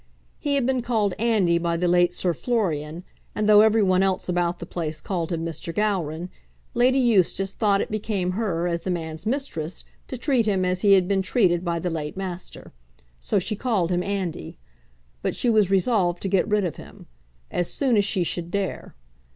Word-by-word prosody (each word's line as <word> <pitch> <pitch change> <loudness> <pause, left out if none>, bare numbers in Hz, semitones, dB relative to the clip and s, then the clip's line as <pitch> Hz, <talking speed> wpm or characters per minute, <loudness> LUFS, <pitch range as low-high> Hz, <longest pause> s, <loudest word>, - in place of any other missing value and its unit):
He 285 -1 0
had 275 -3 +1
been 260 -1 +1
called 220 -5 0
Andy 205 -7 +2
by 170 0 -1
the 180 +1 0
late 175 0 +4
Sir 175 0 0
Florian, 170 -8 -2 0.3
and, 210 0 0
though 210 0 +8
every 220 0 +4
one 185 -1 +3
else 190 -1 0
about 175 -1 0
the - - -7
place 160 -3 -4
called 175 -4 -3
him 165 -1 -2
Mr. 165 0 -4
Gowran, 180 -4 -1 0.4
Lady 250 +2 +3
Eustace 195 -5 +2
thought 200 -3 +2
it - - -4
became 205 -4 -1
her, 180 -4 -1
as 170 -1 -2
the - - -5
man's 160 +1 -4
mistress, 220 - -3 0.2
to 255 - -5
treat 245 -3 +1
him 190 -3 +1
as 180 0 0
he 200 -1 +5
had 185 -2 +4
been 195 -1 +1
treated 185 -3 +2
by 170 -1 -1
the 175 +1 -2
late 155 +1 -4
master. 185 -2 -6 0.5
So 130 - -1
she 205 +3 -1
called 205 -6 0
him 175 0 +1
Andy. 185 - -4 0.6
But - - -2
she 240 - +2
was 210 -4 +3
resolved 190 -3 +1
to - - -1
get 190 -1 +1
rid 210 -2 +1
of 170 - -4
him, - - -13 0.5
as 175 - 0
soon 265 -4 +1
as 205 - +4
she 195 -2 0
should 170 0 -3
dare. 195 +1 -4
185 Hz, 200 wpm, -24 LUFS, 175-215 Hz, 0.6 s, though